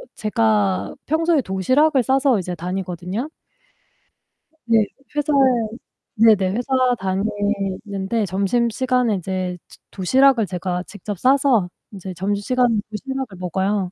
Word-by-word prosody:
제가 105 Hz, -, +1 dB
평소에 320 Hz, 0 st, +2 dB
도시락을 255 Hz, -, +2 dB
싸서 265 Hz, -3 st, +2 dB
이제 180 Hz, -1 st, -4 dB
다니거든요. 180 Hz, -, -4 dB, 1.4 s
네. 225 Hz, -2 st, +3 dB, 0.3 s
회사에 295 Hz, 0 st, +1 dB, 0.8 s
네네. 210 Hz, -4 st, +4 dB
회사 245 Hz, +4 st, -4 dB, 0.3 s
다니는데 200 Hz, +1 st, -2 dB
점심시간에 235 Hz, +4 st, +1 dB
이제 185 Hz, 0 st, -3 dB
저 -, -, -16 dB
도시락을 255 Hz, +4 st, +3 dB
제가 180 Hz, 0 st, -3 dB
직접 205 Hz, 0 st, -7 dB
싸서 260 Hz, -7 st, +3 dB, 0.2 s
이제 190 Hz, -2 st, -7 dB
점심시간에 205 Hz, +6 st, 0 dB, 0.2 s
도시락을 265 Hz, -2 st, -5 dB
먹어요. 190 Hz, +1 st, -1 dB
205 Hz, 265 characters per minute, -21 LUFS, 185-250 Hz, 1.4 s, 네네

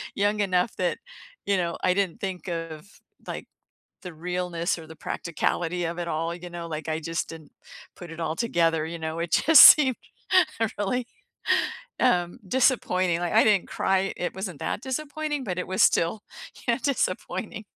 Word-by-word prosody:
young 205 Hz, +1 st, +1 dB
enough 185 Hz, +2 st, +1 dB
that, 180 Hz, -1 st, 0 dB, 0.5 s
you 200 Hz, -1 st, +2 dB
know, 170 Hz, -2 st, -2 dB
I 180 Hz, -, +3 dB
didn't 190 Hz, -3 st, -1 dB
think 190 Hz, -2 st, -5 dB
of, 165 Hz, +2 st, -7 dB, 0.3 s
like, -, -, -6 dB, 0.6 s
the 180 Hz, -2 st, -7 dB
realness 175 Hz, 0 st, -2 dB
or 160 Hz, -, -11 dB
the 160 Hz, -, -11 dB
practicality 170 Hz, +2 st, -2 dB
of 170 Hz, +1 st, -4 dB
it 170 Hz, -, -3 dB
all, 165 Hz, +1 st, -2 dB
you 175 Hz, 0 st, -9 dB
know, 170 Hz, -1 st, -7 dB
like, 160 Hz, 0 st, -5 dB
I 155 Hz, -, 0 dB
just 165 Hz, +1 st, -3 dB
didn't 160 Hz, -2 st, -11 dB, 0.4 s
put 175 Hz, -2 st, -10 dB
it 165 Hz, -, -9 dB
all 160 Hz, -1 st, -2 dB
together, 165 Hz, -8 st, +1 dB
you 170 Hz, +1 st, -5 dB
know, 160 Hz, +1 st, -4 dB
it 170 Hz, -1 st, -3 dB
just 320 Hz, 0 st, +8 dB
seemed 265 Hz, -5 st, +8 dB, 0.8 s
really, 235 Hz, +5 st, -1 dB, 0.9 s
um, 175 Hz, -9 st, +1 dB
disappointing, 185 Hz, -8 st, +2 dB
like, 175 Hz, +2 st, -2 dB
I 220 Hz, -, +6 dB
didn't 205 Hz, -4 st, +3 dB
cry 190 Hz, 0 st, 0 dB
it 175 Hz, -, -3 dB
wasn't 190 Hz, -5 st, -5 dB
that -, -, -3 dB
disappointing, 295 Hz, +2 st, -3 dB
but, 185 Hz, -6 st, -3 dB
it 180 Hz, -, -4 dB
was 190 Hz, 0 st, +2 dB
still, 170 Hz, +6 st, +2 dB, 0.4 s
you 235 Hz, -, +4 dB
know, 235 Hz, -, -2 dB
disappointing, 215 Hz, -5 st, -2 dB
180 Hz, 170 wpm, -26 LUFS, 165-205 Hz, 0.9 s, just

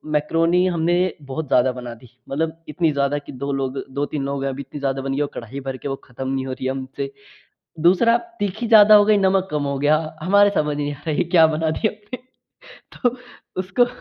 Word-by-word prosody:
Macaroni 165 Hz, +4 st, +2 dB
हमने 170 Hz, -1 st, +1 dB, 0.3 s
बहुत 140 Hz, +2 st, -5 dB
ज़्यादा 125 Hz, 0 st, +3 dB
बना 125 Hz, -1 st, -7 dB
दी। 120 Hz, 0 st, -17 dB, 0.2 s
मतलब 160 Hz, +3 st, -2 dB
इतनी 160 Hz, +1 st, +1 dB
ज़्यादा 140 Hz, 0 st, 0 dB
कि 145 Hz, -, -8 dB
2 140 Hz, +2 st, -4 dB
लोग, 135 Hz, 0 st, -2 dB
2-3 140 Hz, +1 st, -3 dB
लोग 140 Hz, 0 st, -3 dB
अब 135 Hz, 0 st, -3 dB
इतनी 145 Hz, -, -7 dB
ज़्यादा 135 Hz, -1 st, -1 dB
बन 135 Hz, 0 st, -3 dB
गई 140 Hz, -, -1 dB
वो 145 Hz, -, +1 dB
कढ़ाई 120 Hz, +4 st, -6 dB
भर 135 Hz, -1 st, -5 dB
के 140 Hz, -, -7 dB
वो 135 Hz, -, -2 dB
खत्म 130 Hz, +1 st, -7 dB
नहीं 135 Hz, -1 st, -2 dB
हो 130 Hz, -, -4 dB
रही 130 Hz, 0 st, -4 dB
हमसे। 135 Hz, -, -4 dB, 0.7 s
दूसरा 190 Hz, +8 st, +4 dB, 0.2 s
तीखी 205 Hz, +4 st, -2 dB
ज़्यादा 215 Hz, -1 st, +8 dB
हो 205 Hz, -, +6 dB
गयी, 210 Hz, 0 st, +4 dB
नमक 190 Hz, -1 st, +2 dB
कम 150 Hz, -1 st, -1 dB
हो 140 Hz, -1 st, -2 dB
गया 150 Hz, +2 st, +3 dB, 0.2 s
हमारे 200 Hz, +3 st, +5 dB
समझ 150 Hz, -4 st, 0 dB
ही 145 Hz, -, -2 dB
नहीं 145 Hz, -, -3 dB
आ 145 Hz, -, -16 dB
रहा 155 Hz, +2 st, +1 dB
क्या 165 Hz, -3 st, +7 dB
बना 160 Hz, 0 st, 0 dB
दिया 215 Hz, +7 st, 0 dB
हमने। 215 Hz, +4 st, -9 dB, 0.7 s
तो 245 Hz, -1 st, -1 dB, 0.4 s
उसको, 190 Hz, +7 st, +2 dB
150 Hz, 215 wpm, -21 LUFS, 135-185 Hz, 0.7 s, ज़्यादा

